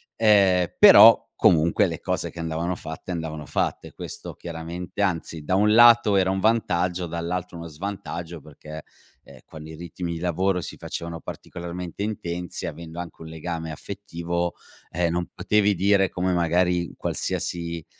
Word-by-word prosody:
Ehm, 100 -5 +4
però - - +9
comunque, 85 -1 +4
le - - -4
cose - - -2
che 85 - -11
andavano 85 +2 -2
fatte 80 +2 -8
andavano 80 -3 -5
fatte. - - -2
Questo - - -8
chiaramente 85 +4 -6
anzi, 85 -4 -2
da 95 - -2
un 105 +2 +4
lato 120 -2 +7
era 95 -1 +3
un 95 - -1
vantaggio, 90 -5 +1
dall'altro 85 +2 -4
uno 85 0 -7
svantaggio 85 0 -6
perché, 75 +1 -11 0.4
ehm, 70 - -15
quando 80 -1 -11
i 80 - -9
ritmi 85 +1 -6
di 80 - -5
lavoro 90 +2 0
si - - -7
facevano 85 0 -6
particolarmente 85 +2 -7
intensi, 90 -4 -4
avendo 85 0 -7
anche 85 -2 -8
un 80 - -8
legame 80 0 -5
affettivo, 85 0 -4 0.4
ehm, 85 0 0
non 85 +1 -2
potevi 105 -1 +2
dire 95 +1 +3
come 90 +1 -1
magari 90 0 +1
qualsiasi, 85 -1 -3
85 Hz, 150 wpm, -24 LUFS, 85-95 Hz, 0.4 s, però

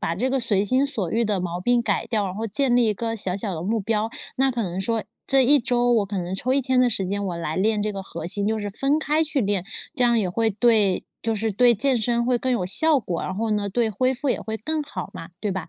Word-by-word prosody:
把 165 - -1
这 245 +9 -1
个 270 - +1
随 205 -5 +1
心 260 +6 +2
所 205 -11 -3
欲 230 +4 +1
的 205 -3 0
毛 175 -1 -3
病 240 +5 +2
改 - - -1
掉， 215 -3 0
然 185 - -5
后 220 +3 -3
建 250 +3 +1
立 245 -1 +4
一 215 - +2
个 230 +2 -3
小 190 -4 -2
小 200 -1 -3
的 160 - -5
目 220 +4 -1
标， 220 +2 -1 0.3
那 270 +1 +2
可 235 -3 -2
能 180 -1 -4
说， 225 +3 0 0.2
这 270 0 +4
一 290 +4 +5
周 245 -1 +1
我 220 -3 +2
可 200 -1 -4
能 180 +1 -4
抽 250 +6 -1
一 275 - +3
天 260 -1 0
的 250 -1 +4
时 200 -3 0
间， 200 +1 -2
我 180 -3 -3
来 160 -2 -3
练 210 +2 +1
这 215 - -1
个 195 -2 -5
核 165 - -7
心， 200 +3 +3
就 220 +1 0
是 205 - -4
分 275 +8 0
开 315 +1 +1
去 300 -2 -1
练， 200 -4 0 0.3
这 255 -5 +2
样 235 -1 +3
也 195 - 0
会 225 +4 +1
对 210 -3 +2 0.2
就 225 0 0
是 220 +1 -1
对 240 +4 +4
健 265 +4 +3
身 235 +1 0
会 250 0 +2
更 255 +1 -1
有 235 -7 0
效 300 - +5
果， 180 -6 -4
然 185 - -4
后 220 +3 -2
呢， 205 -1 0
对 235 +2 +1
恢 255 +5 +1
复 275 +3 -3
也 - - +1
会 220 0 -4
更 310 +7 -2
好 290 - -7
嘛， 165 - -9
对 210 - -2
吧？ 185 -3 -4
220 Hz, 305 characters per minute, -23 LUFS, 195-250 Hz, 0.3 s, 一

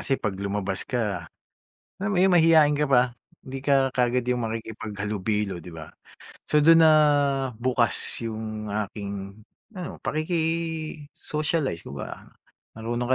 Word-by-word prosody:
kasi 135 - 0
'pag 100 - -2
lumabas 100 -1 -3
ka 105 -9 -2 0.7
alam 200 +2 -2
mo 185 - +1
yun, 190 - +5
mahiyain 160 -4 +5
ka 150 - +1
pa. 125 -1 +4 0.2
Hindi 135 +1 -8
ka 135 -2 +4
kaagad 125 0 +1
yung 125 -1 0
makikipaghalubilo, 105 -4 -3
di 90 - -10
ba? 80 -1 -9 0.6
So, 150 - +2
dun 165 +2 +7
nabukas 135 -6 +2
yung 110 -1 -5
aking 100 -1 -5 0.3
ano, 185 -5 -6
pakiki-socialize, 155 - -2
kumbaga. 70 - -7 0.5
Marunong 120 +2 -3
125 Hz, 120 wpm, -25 LUFS, 105-150 Hz, 0.7 s, dun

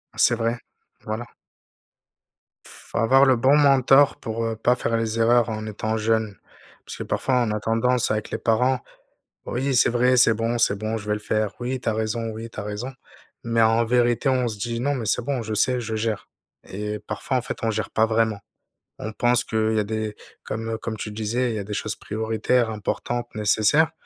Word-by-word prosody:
C'est 120 - +4
vrai. 115 +1 -1 0.5
Voilà. 110 +2 -4 1.4
Faut - - -9
avoir 135 +4 +5
le 130 -1 +5
bon 130 +5 +4
mentor 135 -1 +5
pour, 115 +1 -4
heu, 115 -1 -2
pas 120 +3 +2
faire 115 -2 -1
les 115 0 -2
erreurs 120 0 +4
en 110 0 -4
étant 110 +1 -3
jeune 110 -2 0 0.5
parce - - -8
que, - - -4
parfois, 130 - -1
on 110 - -1
a 105 - -1
tendance 115 +2 +1
avec 110 0 -2
les - - -1
parents: 125 +3 +2 0.7
«Oui, 130 +3 -1
c'est 120 - +5
vrai. 125 +1 +3
C'est 120 -2 +6
bon, 115 +2 -1
c'est 100 - +3
bon, 110 +2 -2
je 105 0 -9
vais 105 - +1
le - - -5
faire. 105 -1 -1
Oui, 125 +1 -3
tu 120 - -2
as - - 0
raison. 110 +1 -2
Oui, 110 +1 -7
tu 110 - -8
as - - -4
raison» 105 +6 -5 0.5
mais 115 0 +2
en 115 +1 +4
vérité, 120 +1 +2
on 125 -2 +1
se 105 -2 -4
dit: 115 +2 -3
«Non, 140 +3 0
mais 115 -4 -4
c'est 105 - +1
bon. 135 -2 -2
Je 110 0 -4
sais, 125 +4 +2
je 110 -1 -4
gère» 110 -1 -2 0.4
et 105 +2 -5
parfois, 130 - -3
en - - 0
fait, 115 - -5
on 110 - +1
gère 110 +1 -3
pas 110 - +2
vraiment. 110 -2 +1 0.6
On 110 - -5
pense 120 +2 +2
qu'il 110 0 0
y - - +2
a - - +1
des 110 0 -3 0.3
comme 115 0 -4
comme 110 0 -5
tu 105 - -5
disais, 115 +4 -1
il - - -3
y - - -2
a - - -4
des 105 +1 -6
choses 105 +1 -3
prioritaires, 110 +2 0
importantes, 120 +3 -3
nécessaires 110 +10 +3
115 Hz, 210 wpm, -23 LUFS, 110-120 Hz, 1.4 s, C'est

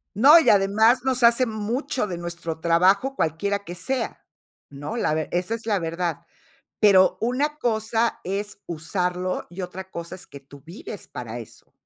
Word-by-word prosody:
No, 280 - +8
y - - 0
además 215 +5 +4
nos 260 -1 0
hace 235 +2 +5
mucho 225 +3 -2
de 180 -4 -5
nuestro 170 -2 -5
trabajo 185 +10 +3
cualquiera 200 - -1
que 175 -3 -9
sea, 245 +6 -3 0.5
¿no?, 145 +10 -6
la 190 -9 0
ve 155 0 -2
esa 180 +5 -1
es 230 -1 -8
la 210 -3 +1
verdad, 170 0 -3 0.6
pero, 195 -3 +5
una 275 +6 0
cosa 225 -2 0
es 200 +3 -4
usarlo, 180 +2 -2
y 185 +2 -6
otra 185 +1 -7
cosa 170 +1 -6
es 185 - -9
que 140 - -12
tú 140 +1 -16
vives 185 +4 -9
para 120 -1 -7
eso. 115 - -13
195 Hz, 165 wpm, -24 LUFS, 170-230 Hz, 0.6 s, No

